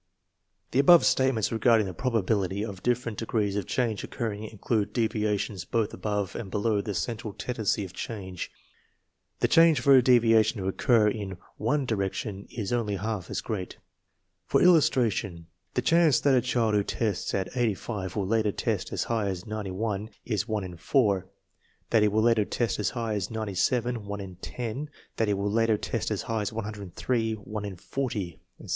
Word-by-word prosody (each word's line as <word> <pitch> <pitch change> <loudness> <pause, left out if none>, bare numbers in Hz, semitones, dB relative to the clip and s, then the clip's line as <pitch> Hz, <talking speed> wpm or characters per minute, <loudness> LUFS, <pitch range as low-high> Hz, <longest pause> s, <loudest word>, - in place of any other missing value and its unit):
The 130 - +2
above 170 +4 +7
statements 130 -5 +2
regarding 115 -1 +4
the 95 - -5
probability 100 -2 0
of 100 -4 -8
different 120 -2 -1
degrees 110 -3 -1
of 100 -3 -2
change 115 -5 -1
occurring 110 -3 -4
include 110 0 -2
devia 110 -3 +1
tions 95 -3 -4
both 110 +4 -1
above 105 -3 -2
and 100 - -5
below 105 +1 +1
the 100 -1 -4
central 105 +5 -3
tendency 110 -4 -1
of 90 - -11
change. 95 -5 -5 0.9
The 120 - +4
chance 165 +4 +6
for 135 +2 +5
a 130 - +8
deviation 115 -3 +4
to 95 - -3
occur 110 +3 +3
in 100 -3 -3 0.2
one 135 +6 0
di 120 - -1
rection 100 0 -3
isonly 105 -2 -2
half 105 -4 -3
as - - -2
great. 100 -5 -5 0.7
For - - +3
illustration, 115 - +3 0.3
the 125 - +1
chance 165 +1 +4
that 140 - +4
a 125 - +5
child 120 -3 +1
who 105 -1 +3
tests 105 -1 -2
at 95 +5 -3
85 105 -5 -2
will 100 -3 0
later 110 +1 +1
test - - -2
as - - -1
high 110 -3 -1
as 90 -2 -4
91 105 0 -3 0.2
is 105 -3 -1
one 110 -3 -1
in 90 -2 -7
four; 100 - +1 0.6
that 115 - +5
he 105 - +5
will 110 +1 +2
later 115 -2 +4
test 115 +2 -1
as 105 - +1
high 115 -3 -3
as 100 -3 -2
97, 110 +3 -1
one 100 0 -4
in 95 -3 -8
ten; 125 +8 -5 0.3
that 110 - +1
he 105 - +2
will 100 +1 -1
later 115 0 +3
test - - -2
as - - -2
high 110 -1 -1
as 105 - -2
103, 110 +2 -2
one 105 0 -6
in 100 -2 -5
forty, 100 -3 -4 0.2
etc. - - -12
110 Hz, 180 wpm, -27 LUFS, 100-120 Hz, 0.9 s, a